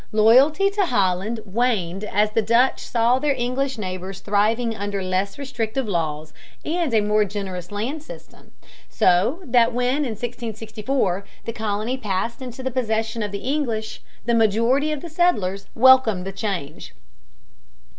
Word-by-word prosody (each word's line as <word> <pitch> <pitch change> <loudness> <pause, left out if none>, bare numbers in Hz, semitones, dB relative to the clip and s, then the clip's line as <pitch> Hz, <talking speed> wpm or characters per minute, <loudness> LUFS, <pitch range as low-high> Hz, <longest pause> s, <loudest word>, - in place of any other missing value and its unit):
Loyalty 270 - +5
to 400 -2 +1
Holland 200 - 0
waned 200 -4 -1
as 210 +1 +1
the 225 - +2
Dutch 235 +5 +2
saw 240 +2 +2
their 290 0 +1
English 255 +2 -1
neighbors 185 -1 -5
thriving 220 +4 +1
under 200 -1 -3
less 185 +2 -1
restrictive 260 -3 -3
laws 155 -4 -2 0.3
and 330 -2 -1
a 220 -2 +3
more 210 +1 +2
generous 190 -3 -5
land 240 +10 -3
system, 305 - -13 0.4
so 200 - +2
that 240 -4 +3
when 250 +2 +1
in 280 -6 -1
1664 220 -3 -3 0.2
the 230 - -3
colony 220 +3 -2
passed 215 +3 -2
into 255 0 -7
the 260 - -2
possession 225 -2 -1
of 205 -2 -3
the 200 +4 -5
English, 230 -8 -3 0.2
the 235 - +1
majority 230 +7 +2
of 300 -2 -3
the - - -7
settlers 205 - 0
welcomed 235 -7 +5
the 195 - -4
change. 195 - -5
225 Hz, 145 wpm, -22 LUFS, 200-255 Hz, 0.4 s, Loyalty